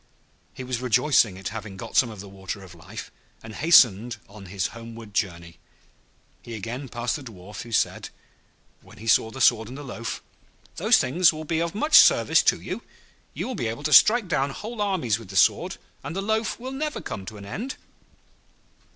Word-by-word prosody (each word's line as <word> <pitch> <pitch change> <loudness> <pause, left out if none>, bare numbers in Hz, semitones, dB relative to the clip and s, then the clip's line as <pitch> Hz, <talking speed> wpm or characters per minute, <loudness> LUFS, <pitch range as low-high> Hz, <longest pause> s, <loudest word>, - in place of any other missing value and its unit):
He 130 - -7
was 125 -1 -3
rejoiced 125 +1 +4
at 95 -1 -6
having 105 -2 -7
got - - -8
some 125 - +4
of 105 -3 -9
the 100 - -10
Water 95 +1 -7
of 90 -3 -13
Life, 90 +6 -10 0.3
and 110 -1 -9
hastened 120 - +5
on 100 -2 -12
his 95 0 -2
homeward 115 -2 -10
journey. 85 -5 -3 0.8
He 115 - -8
again 120 +6 -6
passed 120 +3 -2
the - - -10
Dwarf, 105 -4 -10
who 120 - -10
said, 110 - 0 0.7
when - - -17
he 110 - -11
saw 110 0 +3
the 130 - -9
sword 110 -3 +4
and 130 +3 -9
the 145 - -8
loaf, 115 -3 -6 0.5
'Those - - +5
things 170 +6 +4
will 155 0 -7
be 160 +1 -1
of 170 +2 -2
much 300 +8 +6
service - - +5
to - - +2
you. - - -6 0.5
You - - -3
will 260 - -4
be 140 - -2
able 115 +6 -5
to 150 0 0
strike 230 -2 +7
down 140 -5 0
whole 215 +10 -6
armies 160 - 0
with 115 - -12
the 95 - -9
sword, 95 - +3 0.3
and 165 - -6
the 195 - -1
loaf 220 +2 -1
will 255 +2 -6
never 300 +3 -3
come 95 - -6
to 110 - -8
an 100 - -10
end.' 225 - -5
115 Hz, 200 wpm, -25 LUFS, 105-160 Hz, 0.8 s, strike